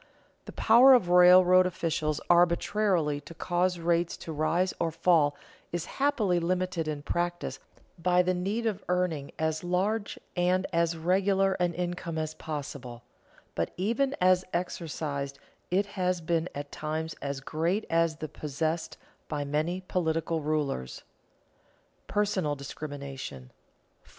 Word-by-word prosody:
The - - -8
power 250 +4 +7
of 185 -8 +1
railroad 180 +1 +7
officials 155 -3 -1
arbitrarily 175 -2 +2
to 170 - -12
cause 180 +2 0
rates 170 0 0
to 165 - -5
rise 170 +5 +1
or 165 - +1
fall 160 -3 +3 0.4
is 170 -1 -3 0.2
happily 220 -11 +2
limited 180 -1 -1
in 150 -2 -4
practice 175 +2 -2 0.4
by 180 +1 +3
the 185 +1 +1
need 200 +6 -2
of 210 -3 -1
earning 180 -6 0
as 160 0 -1
large 200 +4 -1 0.2
and 180 +1 +2
as 170 0 +1
regular 190 +3 +2
an 175 -1 0
income 175 -2 -3
as 155 0 -2
possible, 140 -7 -7 0.5
but 85 - -1
even 235 +9 0
as 185 0 +4
exercised 150 -5 -3 0.3
it 195 +3 +2
has 185 -3 -1
been 165 +1 -1
at 145 0 -6
times 155 +1 -3
as 140 -1 -3
great 165 +9 -1
as 165 -1 +2
that 155 -1 -7
possessed 155 +3 -3 0.3
by 145 -1 -3
many 155 +6 -1
political 165 -3 -1
rulers. 145 - -2 0.2
[Sidenote: - - -38
Personal 190 -7 0
discrimination] 140 - -7 0.5
4. - - -30
170 Hz, 135 wpm, -28 LUFS, 155-185 Hz, 0.5 s, power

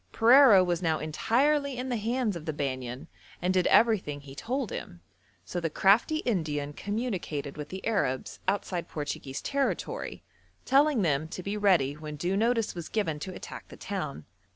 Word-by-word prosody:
Pereira 230 -4 +7
was 175 -1 -1
now 160 -3 +1
entirely 270 - +1
in 255 +1 -3
the 245 - 0
hands 230 -1 -1
of 165 -2 -7
the 155 - -1
Banyan 130 -3 -4 0.3
and 180 +1 0
did 185 -1 +3
everything 200 -11 +3
he 135 -1 -11
told 245 - -3
him; 85 - -7 0.4
so 180 - -3
the 165 -1 -1
crafty 220 - +3
Indian 150 -9 -1
communicated 190 - -3
with 150 -1 -7
the 190 0 -7
Arabs 200 - -1
outside 185 -3 -1
Portuguese 145 -3 -5
territory, 280 -1 -2 0.4
telling 275 -3 +4
them 155 -2 +1
to 180 +2 -7
be 200 +3 -3
ready 185 -10 +3
when 150 0 -7
due 175 +6 -1
notice 230 +1 +1
was 170 -3 -7
given 165 -9 -1
to 185 +4 -6
attack - - -9
the - - -12
town. 75 +1 -5
185 Hz, 170 wpm, -28 LUFS, 150-230 Hz, 0.4 s, Pereira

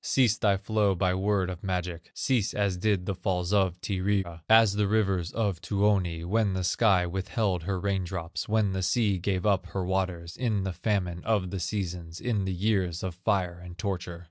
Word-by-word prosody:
"Cease 120 -5 +3
thy 100 -5 +2
flow, 105 -1 +1
by 90 0 +1
word 95 0 +1
of 90 -1 -6
magic, 90 -3 -3
Cease 115 -6 0
as 100 -3 +1
did 95 -1 0
the 100 - -1
falls 90 0 -1
of 95 -3 +2
Tyrya, 95 -3 -1
As 110 -2 +7
the 105 0 +1
rivers 95 -5 +1
of 100 -6 -1
Tuoni, 95 -3 +1
When 105 +1 +1
the 95 - -1
sky 95 0 +3
withheld 95 +1 -1
her 95 -1 -1
rain 100 -1 0
drops, 85 0 -5
When 110 -2 +2
the 95 0 -2
sea 100 0 +1
gave 95 +1 -1
up 95 -3 +2
her 95 0 -3
waters, 90 -2 -2
In 110 -6 0
the 95 -1 -2
famine 90 -2 -1
of 100 -5 0
the 95 - -3
seasons, 85 -3 -4
In 110 -6 -1
the 95 - -1
years 95 -3 0
of 95 -2 -3
fire 90 -1 -1
and 90 -1 -10
torture. 90 -4 -4
95 Hz, 195 wpm, -28 LUFS, 90-105 Hz, -, As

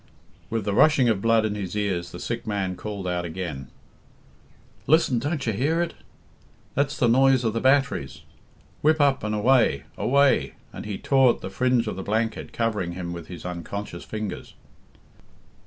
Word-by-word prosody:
With 110 -3 -2
the 100 - 0
rushing 140 0 +5
of 105 -4 +1
blood 115 0 +3
in 105 - -1
his 100 -2 -5
ears 100 -5 -1
the - - -8
sick - - -4
man 95 -3 -1
called 100 -1 -6
out 90 -1 -1
again: 80 -6 -5 1.2
"Listen! 150 -6 +4
Don't 145 +3 -2
you 115 - 0
hear 145 +10 0
it? 175 -1 -1 0.8
That's 140 +1 0
the 120 - +3
noise 130 +1 +4
of 110 -2 0
the 115 - -2
batteries. 130 - +1 0.6
Whip 155 +1 +3
up, 140 -5 +3
and 105 0 -1
away! 115 - +3 0.2
Away!" 140 +1 +3 0.2
and - - -7
he 100 -2 -3
tore 135 -3 +4
at - - -17
the 95 - -6
fringe 125 +1 +1
of 105 - -4
the - - -4
blanket 110 +3 -2
covering 105 -7 -1
him 85 -1 -5
with 85 -2 -8
his 90 -2 -9
unconscious 90 +3 -6
fingers. 110 -2 -6
110 Hz, 170 wpm, -25 LUFS, 95-130 Hz, 1.2 s, rushing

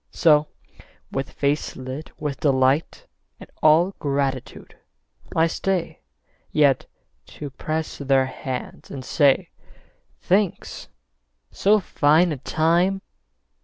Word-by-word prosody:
So, 150 -2 +4 0.6
with 135 0 -3
face 145 +1 -1
lit 130 +4 -7
with 145 -3 -4
delight 135 +1 +1 0.3
And - - -13
all 165 +5 +5
gratitude, 140 -2 -3 0.6
I 160 - +4
stay 180 +1 -2 0.5
Yet 145 -3 +3 0.4
to 145 -2 -8
press 155 +4 -4
their 135 -1 +2
hands 130 -1 -6
and 130 -2 -7
say, 140 -2 +3 0.7
"Thanks. 190 0 -1 0.6
So 210 +2 +3
fine 160 -1 +3
a 150 - -3
time 170 +8 +1
150 Hz, 100 wpm, -23 LUFS, 135-165 Hz, 0.7 s, all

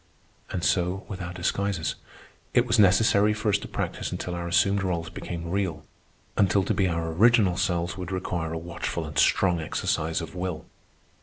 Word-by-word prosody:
And 85 - -3
so 90 +1 +1
with 95 -2 -6
our 90 -1 -4
disguises. 90 0 -1 0.6
It 120 - +5
was 115 -1 +2
necessary 105 +1 +5
for 105 0 -1
us 100 0 +3
to - - -8
practise - - -3
until 90 - -4
our 85 0 -4
assumed 95 +4 +3
roles 85 -4 -2
became 85 -1 -6
real; 95 -5 -2 0.5
until 100 -1 +3
to - - 0
be 95 - +2
our 85 -1 -1
original 105 0 +4
selves 90 -1 -1
would 90 0 -5
require 90 -3 -2
a 80 - -3
watchful 85 0 -4
and 75 -1 -2
strong 90 -3 +3
exercise 80 +1 -1
of 80 -1 -7
will. 90 -3 -4
90 Hz, 175 wpm, -26 LUFS, 85-100 Hz, 0.6 s, It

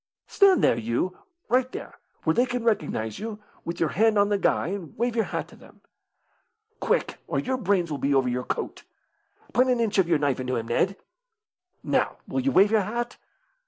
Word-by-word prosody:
"Stand 395 -2 +4
there, 115 - +4
you 115 +11 -1 0.3
right 255 +1 +2
there, - - -8 0.2
where 160 - +2
they 245 +6 +2
can 245 -1 -2
recognise 150 - -1
you, 220 -1 -5 0.3
with 170 0 -5
your 165 - +2
hand 220 +3 +3
on 205 0 +4
the 205 - +2
guy, 175 - +1
and 185 -6 -6
wave 240 0 0
your 225 - +2
hat - - -4
to - - -15
them. - - -18 1.0
Quick, - - 0
or - - -2
your 260 0 -1
brains 190 -7 +1
will 145 - -3
be 140 +2 +1
over 135 -2 +3
your 125 0 -1
coat. - - -4 0.7
Put 255 +1 +4
an 250 -2 +2
inch 215 -3 +1
of 185 - +4
your 165 - +4
knife 145 -3 0
into 130 0 -2
him, 115 0 -3
Ned. 190 +11 +1 0.9
Now, - - 0
will - - -2
you 270 +1 +1
wave 200 -1 +5
your 220 -1 +4
hat? 235 +4 -3
200 Hz, 200 wpm, -26 LUFS, 150-235 Hz, 1.0 s, wave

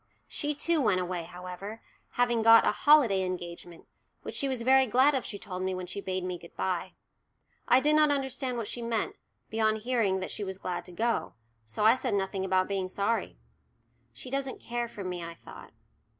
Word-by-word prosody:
She 295 0 -2
too 330 +1 +2
went 200 -7 +3
away, 180 -2 -3
however, 180 +5 -8 0.3
having 240 -2 +2
got 225 +1 +7
a - - +4
"holiday 240 -6 +5
engagement," 175 -2 -6 0.4
which - - -6
she 280 - -1
was 255 -3 -2
very 265 +1 +5
glad 260 +6 +4
of 265 -3 0
she 205 - -5
told 185 -2 -6
me 185 0 -1
when 185 0 -5
she 185 +3 -6
bade 185 -1 -3
me 180 -1 -4
good 170 - -14
bye. 185 -2 -2 0.7
I 250 - +6
did 300 +2 +3
not 305 -1 +5
understand 265 -3 -1
what 230 -3 -3
she 240 - -4
meant, 230 -2 -2 0.4
beyond 220 -1 +1
hearing 225 -6 +1
that 185 - -4
she 210 - -4
was 190 -1 -4
glad 180 -2 -4
to 180 - -10
go, 230 +6 -1 0.3
so 110 - -1
I 220 - +8
said 250 -5 -1
nothing 195 -1 -1
about 185 0 +2
being 195 -2 -2
sorry. 200 - -1 0.7
"She 135 - -10
doesn't 275 -1 -2
care 240 0 -3
for 205 -3 -8
me," 180 -2 -4
I 170 0 -7
thought. - - -13
210 Hz, 200 wpm, -29 LUFS, 185-245 Hz, 0.7 s, I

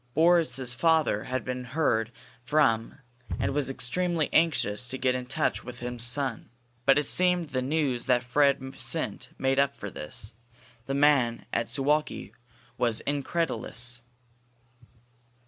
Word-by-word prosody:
Boris's 160 -6 +4
father 155 -5 +2
had 130 -2 -3
been 125 0 -3
heard 120 -4 0 0.3
from 125 -6 +2 0.4
and - - 0
was 140 -2 0
extremely 165 +5 -1
anxious 125 -8 +2
to 130 +1 -4
get 130 -1 +1
into 125 0 -5
touch 155 +4 -1
with 125 -1 -9
his 120 -1 -3
son. 130 0 0 0.4
But 135 0 +6
it 150 - +3
seemed 180 +1 +2
the 130 - 0
news 135 -3 -1
that 125 -1 +3
Fred 135 +1 +1
sent - - -2
made 135 0 +1
up 140 0 +2
for - - -7
this. 105 +8 -6 0.5
The 135 - -1
man 140 -5 +3
at 115 - 0
Suwalki 145 +5 0 0.5
was 115 -2 +1
incredulous. 125 -5 -2
130 Hz, 135 wpm, -27 LUFS, 120-150 Hz, 0.5 s, But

